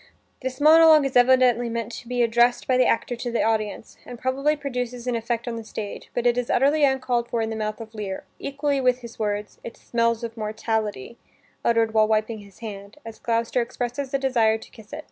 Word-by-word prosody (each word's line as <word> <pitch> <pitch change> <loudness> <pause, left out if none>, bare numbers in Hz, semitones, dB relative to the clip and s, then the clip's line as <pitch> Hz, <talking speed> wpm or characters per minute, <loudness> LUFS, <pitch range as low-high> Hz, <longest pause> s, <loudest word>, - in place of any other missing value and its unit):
This 260 0 -4
monolog 315 0 +7
is 270 - -3
evidently 245 -1 +4
meant 230 0 -4
to 235 - -9
be 245 0 +1
addressed 240 +1 +2
by 255 - +3
the 255 0 +4
actor 245 +1 0
to 240 0 -4
the 235 - +1
audience, 220 -1 -2
and 245 - -9
probably 270 +5 0
produces 250 -4 -4
an 250 -1 -1
effect 230 +1 -3
on 235 -1 -3
the 225 - -6
stage, 215 -1 -7
but 245 - -1
it 240 0 +3
is 245 - -4
utterly 290 +4 +3
uncalled 255 -3 +1
for 235 - -1
in 225 0 -1
the - - -3
mouth 215 0 -3
of 225 0 -10
Lear, 205 -3 -5 0.2
equally 280 0 -1
with 250 0 +2
his 235 -1 -11
words: 210 -1 -3
"It 230 - -8
smells 230 0 0
of 230 -1 -5
mortality," 215 - -3 0.4
uttered 230 -1 +2
while 215 -1 +4
wiping 215 +1 0
his 200 -1 -16
hand, 200 0 -8
as 225 -1 -9
Gloucester 230 +1 0
expresses 245 +3 -4
a 275 - +1
desire 235 -5 +2
to 220 - -15
kiss 220 -2 -16
it. - - -6
235 Hz, 215 wpm, -24 LUFS, 220-255 Hz, 0.4 s, monolog